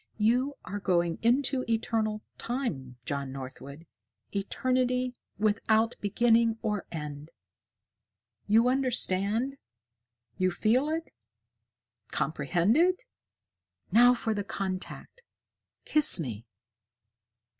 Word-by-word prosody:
"You 250 +6 +2
are 205 +2 -5
going 175 -4 0
into 255 +2 +2
Eternal 220 -1 -1 0.2
Time, 150 - -4
John 140 -2 -3
Northwood, 135 +3 -9 0.5
Eternity 250 +4 0 0.2
without 220 +2 +2
beginning 230 +2 +3
or 210 -3 -2
end. 150 -1 -6 1.2
You 225 +3 +4
understand? 250 -1 +1 0.8
You 185 0 +3
feel 235 - +1
it? 325 +1 -3 1.0
Comprehend 170 - +1
it? 365 +7 +3 0.9
Now 245 +2 +6
for 225 -2 -2
the 205 -1 -2
contact 195 - -5 0.6
kiss 305 -10 +6
me!" 115 -6 -5
220 Hz, 90 wpm, -28 LUFS, 175-250 Hz, 1.2 s, Now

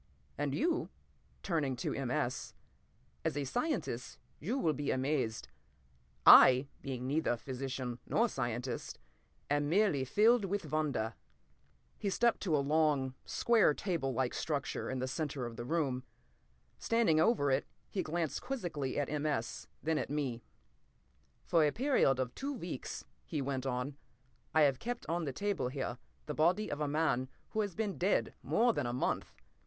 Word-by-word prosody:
And 145 -1 -1
you"—turning 175 - -2
to 120 - -2
M. 135 -3 -3
S.—"as 130 0 -5
a 145 - 0
scientist 240 - -2 0.2
you 220 - -2
will 160 - +2
be 145 -1 -3
amazed. 130 -4 0 0.8
I, 130 +2 +9
being 130 -2 -4
neither 140 -3 +1
physician 130 -1 -4
nor 235 - +3
scientist, 120 - -3 0.5
am 145 0 +1
merely 180 -6 +3
filled 215 - +4
with 200 +1 -3
wonder!" 140 -8 0 0.9
He 200 - -1
stepped 235 +4 +2
to 165 -6 +2
a 140 - 0
long, 145 -3 +2
square 225 -10 +3
table 165 -9 -1
like 130 0 0
structure 145 -4 -2
in 130 - -2
the 130 0 -2
center 140 -2 -3
of 120 -1 -6
the 120 - -6
room. 135 -4 0 0.8
Standing 230 -9 +3
over 160 - +3
it, 135 +2 +1 0.2
he 190 - -2
glanced 165 -2 -2
quizzically 175 - -3
at 145 -2 +1
M. 150 0 -1
S., 120 -6 -2 0.2
then 160 0 +1
at - - -3
me. 135 -5 -2 1.0
"For 165 -2 +4
a 150 - +3
period 250 - +3
of 125 -1 -1
two 280 +2 -3
weeks," 175 - -6 0.2
he 155 - -3
went 135 -1 -2
on, 130 +2 -2 0.5
"I 160 - +4
have 140 -3 +4
kept, 240 +5 -4
on 170 0 -1
the 140 - -2
table 200 +1 -1
here, 130 +1 -4 0.3
the - - -3
body 175 +7 +2
of 145 - -3
a 150 - +1
man 145 -4 +1 0.2
who 220 - +1
has 200 -5 -3
been 210 -3 -2
dead 190 +3 +1
more 235 +1 +3
than 120 - -1
a 120 - -2
month. 125 - -1
145 Hz, 160 wpm, -33 LUFS, 130-180 Hz, 1.0 s, I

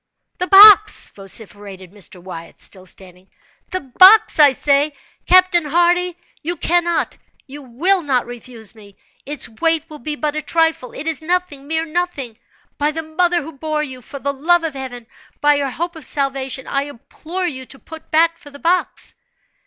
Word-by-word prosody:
"The 360 - -1
box!" 420 +2 +8
vociferated 195 -2 -9
Mr. 195 -2 -7
Wyatt, 175 -2 -10
still 185 -1 -6
standing—"the 185 - -10
box, 370 - +6
I 290 -2 +8
say! 285 +2 +1 0.3
Captain 365 -2 +5
Hardy, 350 +3 +1 0.2
you 345 +3 -3
cannot, 345 +1 0 0.3
you 290 +1 -10
will 325 +10 +1
not 265 -6 0
refuse 235 -3 -9
me. 205 -3 -17 0.3
Its 295 +1 -1
weight 325 +7 -1
will 300 - -9
be 295 +5 -4
but 300 0 -3
a 305 - -2
trifle—it 320 -4 -1
is 325 0 -2
nothing—mere 320 -2 -2
nothing. 310 -8 -3 0.4
By 295 +1 +2
the 320 +1 -4
mother 345 +2 0
who 320 - -9
bore 305 +1 -3
you—for 260 -1 -8
the 280 +1 -3
love 335 +5 +2
of 320 -3 -3
Heaven—by 265 +2 -3
your 285 -1 -1
hope 340 +6 -4
of 320 - -11
salvation, 270 -2 -2
I 275 0 -1
implore 310 +7 -7
you 260 -6 -5
to 275 - -9
put 320 +3 -13
back 330 +1 +2
for 290 - -14
the 285 - -13
box!" 345 +5 -1
295 Hz, 160 wpm, -18 LUFS, 255-335 Hz, 0.4 s, box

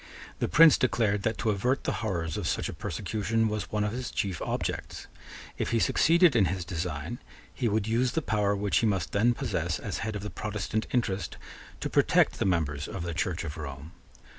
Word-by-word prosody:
The - - +1
Prince 165 -2 +7
declared 110 -5 +1
that 110 +1 -1
to 110 - +1
avert 125 +7 0
the - - 0
horrors 85 -7 -2
of - - -2
such - - 0
a - - -5
persecution 110 +1 -1
was 105 0 -3
one 105 -1 0
of 105 - -1
his 125 +2 -4
chief 95 -4 -2
objects. - - -3 0.5
If - - -1
he 115 - +1
succeeded 165 +6 +4
in 105 -5 +5
his 90 0 -2
design, 85 - -4 0.3
he 120 -4 0
would 105 0 0
use 120 +3 +1
the 160 - 0
power 105 -3 +1
which 100 0 +1
he 115 - +3
must 95 -6 -1
then 120 +4 +3
possess, 90 - -1
as 100 - -4
head 110 -1 -3
of 100 - -4
the 105 - -5
Protestant 105 +1 -3
interest, 100 -8 -1 0.4
to - - -1
protect - - +3
the - - +1
members 80 -5 0
of 90 - -5
the 85 -1 -3
Church 90 +1 -1
of 80 -2 -6
Rome. 70 +1 -7
105 Hz, 205 wpm, -28 LUFS, 85-115 Hz, 0.5 s, Prince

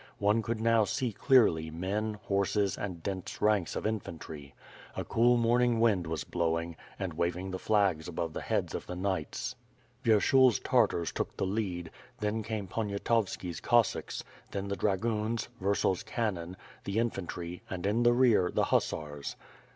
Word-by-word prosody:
One 105 +3 +3
could 115 +1 -2
now 115 0 +4
see 120 +4 -1
clearly 95 - +4
men, 100 +6 -2
horses 100 0 +1
and 90 -5 -5
dense 95 -2 -4
ranks 105 -4 +2
of - - -3
infantry. 80 -9 -5 0.4
A - - -2
cool 120 +2 +4
morning 120 0 +3
wind 105 -7 +3
was 80 -3 -2
blowing, 85 -1 -1 0.2
and - - -3
waving 90 +2 -2
the 95 - -4
flags 100 -8 +2
above 85 -2 -3
the - - -4
heads - - -1
of - - -5
the 90 - -5
knights. 95 -4 -2 0.5
Vyershul's 120 +2 +5
Tartars 110 -9 +2
took - - -4
the - - 0
lead, 95 -4 -2 0.3
then 105 +1 -1
came 110 -2 -4
Poniatowski's 100 -3 -1
Cossacks, 120 -3 +1 0.3
then 100 0 -4
the 100 - -1
dragoons, 110 +3 0
Vurtzel's 100 0 +1
cannon, 95 -6 -3 0.3
the 100 +2 -3
infantry, 90 -6 -3
and, 95 -1 -4
in 105 +4 +2
the 120 0 +5
rear, 120 -8 +4
the - - +1
hussars. 75 -2 -1
100 Hz, 150 wpm, -30 LUFS, 90-115 Hz, 0.5 s, Vyershul's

